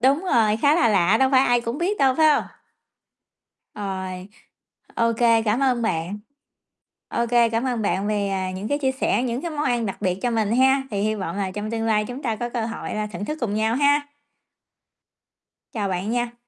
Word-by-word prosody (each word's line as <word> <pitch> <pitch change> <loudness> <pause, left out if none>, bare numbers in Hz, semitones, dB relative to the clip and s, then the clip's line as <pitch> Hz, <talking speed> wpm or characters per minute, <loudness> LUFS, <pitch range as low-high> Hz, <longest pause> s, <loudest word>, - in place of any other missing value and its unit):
Đúng 275 +8 +2
rồi, 225 - +2
khá 285 +6 +3
là 340 -6 +3
lạ, 195 -1 +3
đâu 265 0 +3
phải 260 -2 +5
ai 245 0 +3
cũng 235 +3 -4
biết 390 +4 -1
đâu, 265 -1 +3
phải 315 +2 +4
hông? - - 0 1.3
Rồi, 190 -2 -5 0.7
OK, 230 -1 +1 0.3
cảm 220 +4 +1
ơn 255 -3 +1
bạn. 180 -2 -2 0.9
OK, 235 0 -2 0.2
cảm 230 +2 0
ơn 245 -3 -1
bạn 195 0 0
vì, 205 -2 0
à, 190 -1 -2
những 190 +3 -5
cái 285 - 0
chia 265 -2 0
sẻ, 265 -2 0
những 250 +1 -2
cái 340 - -3
món 300 -1 -3
ăn 240 -3 0
đặc 195 - -4
biệt 180 0 0
cho 245 - +1
mình 220 -2 0
ha, 265 +1 +4
thì 200 -2 -2
hy 215 +1 0
vọng 190 -4 -4
là 195 -2 -2
trong 210 +3 -5
tương 225 -1 -2
lai 210 -1 +2
chúng 250 +3 -7
ta 230 -4 -1
có 240 +2 -3
cơ 235 -2 -2
hội 230 - -5
là 215 0 -2
thưởng 205 -1 -6
thức 305 +7 -4
cùng 220 -5 -2
nhau 220 +1 +1
ha. 285 +1 +2 1.6
Chào 205 -3 -2
bạn 190 +3 -2
nha. 240 0 -1
230 Hz, 210 wpm, -23 LUFS, 205-260 Hz, 1.6 s, phải